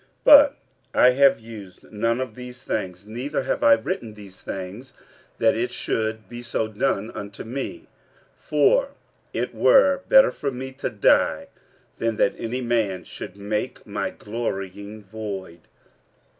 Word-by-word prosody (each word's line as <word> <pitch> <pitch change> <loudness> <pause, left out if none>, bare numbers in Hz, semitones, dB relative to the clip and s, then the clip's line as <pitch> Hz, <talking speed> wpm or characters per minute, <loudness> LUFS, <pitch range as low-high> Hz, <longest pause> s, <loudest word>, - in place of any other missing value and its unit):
46:009:015 - - -36
But 290 -1 +8 0.4
I 125 - +7
have 140 +2 +4
used 105 -5 -12
none 115 +3 0
of 130 0 -4
these 125 0 -10
things: 95 -2 -4
neither 120 +7 -3
have - - -2
I 290 -1 +7
written 150 - -2
these 100 -3 -13
things, 100 +8 -7 0.4
that - - +3
it - - -1
should 110 -2 -2
be 120 +3 -8
so 115 -2 -2
done 110 0 -1
unto 100 -1 -8
me: 140 - -5 0.5
for - - +2 0.4
it - - -3
were 280 - +5
better - - +7
for 140 - -3
me 130 0 -6
to 135 +2 -4
die, 105 -2 +2 0.5
than 115 -1 0
that 100 - +2
any 120 +3 -3
man 110 -7 0
should 90 - -9
make 105 +1 -4
my - - -3
glorying 105 -1 -5
void. 95 -4 -7
115 Hz, 145 wpm, -23 LUFS, 100-130 Hz, 0.5 s, But